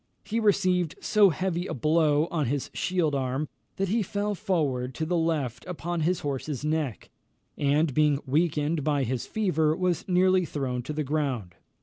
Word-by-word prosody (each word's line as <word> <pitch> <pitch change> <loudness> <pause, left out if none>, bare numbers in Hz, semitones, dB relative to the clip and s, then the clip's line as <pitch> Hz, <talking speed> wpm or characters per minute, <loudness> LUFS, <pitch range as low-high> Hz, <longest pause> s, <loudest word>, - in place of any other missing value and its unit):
He 225 +2 -2
received 185 -6 +2
so 210 -2 +5
heavy 180 +1 -2
a - - -4
blow 155 +2 +3
on 155 -6 0
his 140 +2 -2
shield 175 -5 0
arm, 135 +2 -1 0.3
that 195 -1 -1
he 225 +3 +2
fell 205 +1 -2
forward 145 - -1
to 160 - -2
the 175 +3 0
left 160 -8 -1
upon 175 -1 -3
his 175 +3 +1
horse's 145 0 -3
neck; 155 -6 -2 0.4
and 145 +1 +2
being 150 0 +3
weakened 150 +1 +1
by 145 -2 +1
his 125 0 -2
fever, 160 -8 +1
was 180 -1 0
nearly 185 0 +4
thrown 135 -6 -3
to 130 +5 -5
the 155 0 -1
ground. 135 - -2
155 Hz, 165 wpm, -27 LUFS, 140-180 Hz, 0.4 s, so